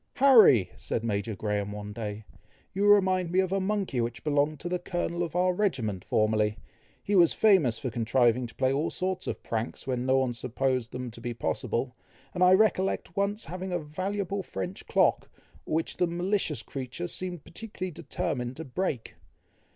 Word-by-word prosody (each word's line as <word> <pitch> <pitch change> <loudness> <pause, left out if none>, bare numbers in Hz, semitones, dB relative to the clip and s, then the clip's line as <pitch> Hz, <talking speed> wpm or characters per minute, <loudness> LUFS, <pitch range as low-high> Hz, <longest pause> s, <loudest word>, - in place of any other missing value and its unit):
"Harry!" 225 - +6
said 115 - -3
Major 105 -1 -2
Graham 105 0 -2
one 105 0 -6
day, 105 -1 -5 0.5
"you 200 +2 +1
remind 185 -3 +4
me 185 - +2
of 190 -1 +1
a 195 - +1
monkey 190 - -1
which 120 0 -4
belonged 150 0 +1
to 175 - -4
the 180 0 -1
colonel 175 -1 -3
of 170 -2 -3
our 180 +1 +3
regiment 125 - -1
formerly. 110 0 +1 0.5
He 205 - 0
was 175 -3 +6
famous 185 - +4
for 130 - -4
contriving 120 +1 +2
to 115 - -16
play 130 0 +1
all 150 +4 0
sorts 185 0 -3
of - - -4
pranks 115 +1 -3
when 125 -1 -2
no 130 0 +4
one 130 -2 +1
supposed 125 +1 -1
them 125 -1 -5
to 115 - -12
be 120 0 -4
possible, 120 +2 -2 0.4
and 180 - +1
I 180 +1 +7
recollect 190 -4 +1
once 200 +2 0
having 185 +2 -5
a 175 - +1
valuable 190 +5 -3
French 95 - -6
clock, - - +2 0.4
which 160 +1 -1
the 180 - +2
malicious 175 -2 -1
creature 135 +6 -5
seemed 175 -2 -3
particularly 185 -1 -6
determined 125 -4 -3
to 160 - -6
break. 135 -3 -3
150 Hz, 175 wpm, -28 LUFS, 120-185 Hz, 0.5 s, I